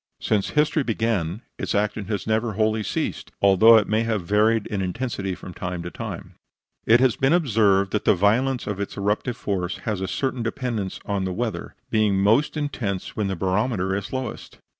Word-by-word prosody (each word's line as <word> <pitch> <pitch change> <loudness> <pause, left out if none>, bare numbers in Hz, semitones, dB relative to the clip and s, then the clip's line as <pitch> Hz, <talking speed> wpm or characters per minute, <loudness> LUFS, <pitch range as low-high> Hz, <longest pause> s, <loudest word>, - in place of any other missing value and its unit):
Since 105 -2 0
history 150 +1 +3
began 110 - -1 0.2
its - - -2
action 105 0 0
has 105 -1 -3
never 110 0 0
wholly 110 +1 +1
ceased, - - -3
although 105 +4 +7
it 105 - +2
may 110 +1 +1
have 110 -4 -1
varied 105 +3 +2
in 100 -2 -3
intensity 95 -1 -3
from 90 - -10
time 90 -1 -5
to 85 - -6
time. - - -7 0.5
It 115 +2 +6
has 130 -3 +4
been 135 +4 +2
observed 105 - +3
that 105 - -1
the - - +5
violence 120 +7 +2
of 105 -2 -4
its 100 - -4
eruptive 105 +5 -1
force 95 -3 -2
has 105 -4 -2
a 95 - -2
certain 130 +1 -2
dependence 115 -4 -3
on 100 -2 -1
the 95 - -2
weather 105 -2 -4 0.2
being 110 -2 +3
always 95 +1 +1
most 130 +9 +3
intense 115 -10 -3
when 105 -2 -1
the 95 - -2
barometer 95 +1 0
is 100 -1 -4
lowest. 130 -3 -5
105 Hz, 190 wpm, -24 LUFS, 95-115 Hz, 0.5 s, although